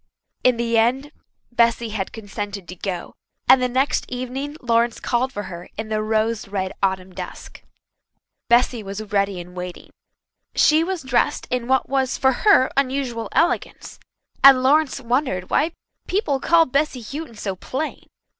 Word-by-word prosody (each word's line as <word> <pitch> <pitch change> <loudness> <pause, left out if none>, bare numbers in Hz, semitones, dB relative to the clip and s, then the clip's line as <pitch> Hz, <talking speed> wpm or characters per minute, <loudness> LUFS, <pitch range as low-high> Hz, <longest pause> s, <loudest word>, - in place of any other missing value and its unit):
In 250 -2 +4
the 230 -1 +1
end 260 +6 +1 0.4
Bessy 235 -1 +2
had 210 -3 -3
consented 205 -3 -6
to 180 - -8
go, 180 -1 -5 0.3
and 265 - +7
the 250 - +1
next 260 +3 +1
evening 255 +4 -5
Lawrence 235 -1 +1
called 255 +2 0
for 205 - -5
her 175 -2 -9
in 220 0 -5
the 215 0 0
rose 220 0 0
red 190 -2 -3
autumn 190 -1 -1
dusk. - - -8 0.9
Bessy 240 0 +3
was 200 +1 -6
ready 200 -2 +1
and 180 +1 -10
waiting. 180 0 -7 0.6
She 310 +1 +5
was 365 -2 -3
dressed 250 -2 +1
in 245 -1 -1
what 265 0 +2
was 265 -1 0
for 265 - +3
her 260 - +4
unusual 255 -5 -1
elegance, 335 +2 0 0.4
and 270 -2 +8
Lawrence 285 +1 +3
wondered 245 -7 -1
why 320 +3 +2 0.4
people 330 -8 0
called 330 -1 +3
Bessy 275 -3 0
Houghton 280 +2 -7
so 195 -2 -4
plain. 265 - -5
240 Hz, 155 wpm, -22 LUFS, 205-270 Hz, 0.9 s, and